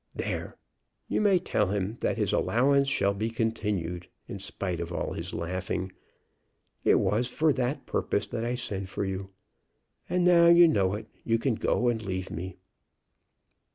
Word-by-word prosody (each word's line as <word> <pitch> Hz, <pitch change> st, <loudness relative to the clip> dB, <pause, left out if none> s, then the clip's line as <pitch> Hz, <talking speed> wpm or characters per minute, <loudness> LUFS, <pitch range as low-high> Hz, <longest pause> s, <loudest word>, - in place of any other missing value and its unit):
There! -, -, -4 dB, 0.5 s
you -, -, 0 dB
may 200 Hz, -3 st, +5 dB
tell 105 Hz, -, 0 dB
him 100 Hz, +3 st, -2 dB
that -, -, 0 dB
his -, -, 0 dB
allowance 140 Hz, +3 st, +3 dB
shall 100 Hz, -7 st, +2 dB
be 110 Hz, +3 st, -2 dB
continued, 105 Hz, -7 st, -2 dB, 0.2 s
in 100 Hz, -, -6 dB
spite 95 Hz, -2 st, -4 dB
of 85 Hz, 0 st, -4 dB
all -, -, -3 dB
his -, -, -5 dB
laughing. 90 Hz, +2 st, -3 dB, 0.9 s
It -, -, +5 dB
was 115 Hz, +4 st, +1 dB
for 155 Hz, +4 st, +2 dB
that 130 Hz, +2 st, -2 dB
purpose -, -, -1 dB
that 115 Hz, -, -4 dB
I 120 Hz, +1 st, -1 dB
sent 100 Hz, -6 st, -4 dB
for 100 Hz, -, -3 dB
you. 95 Hz, 0 st, -4 dB, 0.8 s
And, 180 Hz, -1 st, +1 dB
now 170 Hz, -1 st, +6 dB
you 170 Hz, 0 st, +8 dB
know 100 Hz, -, +2 dB
it, 105 Hz, -, -6 dB, 0.2 s
you 115 Hz, 0 st, +2 dB
can 125 Hz, +2 st, 0 dB
go 120 Hz, +2 st, 0 dB
and 115 Hz, -2 st, +1 dB
leave 95 Hz, -2 st, -4 dB
me." 90 Hz, +2 st, -5 dB
105 Hz, 165 wpm, -28 LUFS, 95-125 Hz, 0.9 s, you